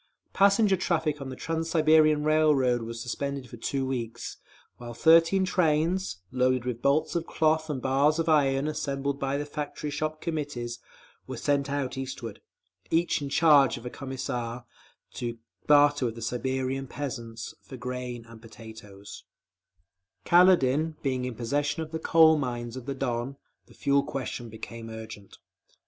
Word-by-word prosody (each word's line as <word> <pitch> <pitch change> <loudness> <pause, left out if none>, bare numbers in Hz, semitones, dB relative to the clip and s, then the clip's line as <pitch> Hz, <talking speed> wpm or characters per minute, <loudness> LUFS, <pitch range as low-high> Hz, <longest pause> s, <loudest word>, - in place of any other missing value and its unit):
_ - - -42
Passenger 200 0 +4
traffic 160 -5 -1
on 135 - -5
the 130 - -6
Trans 165 +2 -3
Siberian 155 -2 +4
Railroad 150 -6 +3
was 115 0 -6
suspended 135 +3 -4
for 120 - -11
two 135 +3 -2
weeks, 120 -3 -4 0.4
while 120 -1 -8
thirteen 165 +6 +5
trains, 165 - +1
loaded 130 -1 +1
with 120 -2 -3
bolts 140 +3 +2
of 170 -1 -2
cloth 155 0 +1
and 135 -4 -3
bars 140 +4 +3
of 165 0 -1
iron 140 -2 +3
assembled 140 -2 -2
by 135 0 -1
the 145 - -3
Factory 150 0 -5
Shop 155 +1 -3
Committees, 145 -8 -4 0.5
were - - -6
sent 140 -1 0
out 135 -2 -2
eastward, 125 -5 -6 0.5
each 165 -1 +1
in 140 - -4
charge 145 -3 +5
of 120 - -11
a 125 - -5
Commissar, 125 -3 -5 0.5
to 120 -1 -4 0.3
barter 145 -2 +5
with 115 - -5
the 115 - -9
Siberian 130 +3 -2
peasants 120 -5 -6
for 130 - -10
grain 125 -1 -5
and 115 -1 -14
potatoes…. 110 -3 -12 1.0
Kaledin 160 -4 +4
being 130 -2 -1
in 125 -2 -4
possession 145 +7 -1
of 155 - -10
the 160 - -3
coal 160 -1 +5
mines 120 -3 -4
of 130 -1 -8
the 140 - -3
Don, 130 0 -3 0.3
the - - -19
fuel 140 0 +2
question 135 -4 -5
became 115 +1 -8
urgent. 110 -3 -10
135 Hz, 155 wpm, -27 LUFS, 120-155 Hz, 1.0 s, thirteen